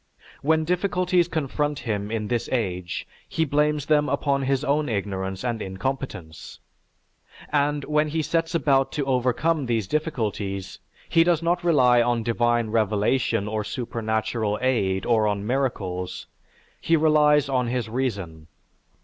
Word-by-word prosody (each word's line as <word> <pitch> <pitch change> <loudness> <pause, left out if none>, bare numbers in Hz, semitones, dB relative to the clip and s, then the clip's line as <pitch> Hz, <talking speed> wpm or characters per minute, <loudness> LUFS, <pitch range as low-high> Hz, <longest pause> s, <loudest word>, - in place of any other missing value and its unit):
When 160 +2 +2
difficulties 180 0 +1
confront 150 -2 -1
him 105 -4 -3
in 110 -1 -2
this 120 0 -2
age, 90 -8 -2 0.2
he 160 - 0
blames 150 0 +1
them 150 -2 +2
upon 140 0 0
his 135 +1 0
own 150 0 +1
ignorance 95 -2 -3
and 120 -3 -2
incompetence. 95 - -5 0.9
And, 145 0 +1
when 150 0 +1
he 155 +1 -1
sets 165 +1 -1
about 135 -4 +2
to 145 -2 -1
overcome 135 +4 +1
these 115 -4 0
difficulties, 105 - -3 0.3
he 165 - +4
does 170 -1 +1
not 175 +1 +1
rely 125 -8 +5
on 120 -1 +1
divine 120 -1 +1
revelation 110 0 +1
or 105 0 -2
supernatural 110 -1 -2
aid 100 -7 0
or 110 -3 +3
on 100 -1 -1
miracles; 100 -8 -2 0.6
he 165 - +3
relies 150 -2 +4
on 130 -3 0
his 120 -1 -2
reason. 100 -10 -3
125 Hz, 135 wpm, -24 LUFS, 105-150 Hz, 0.9 s, rely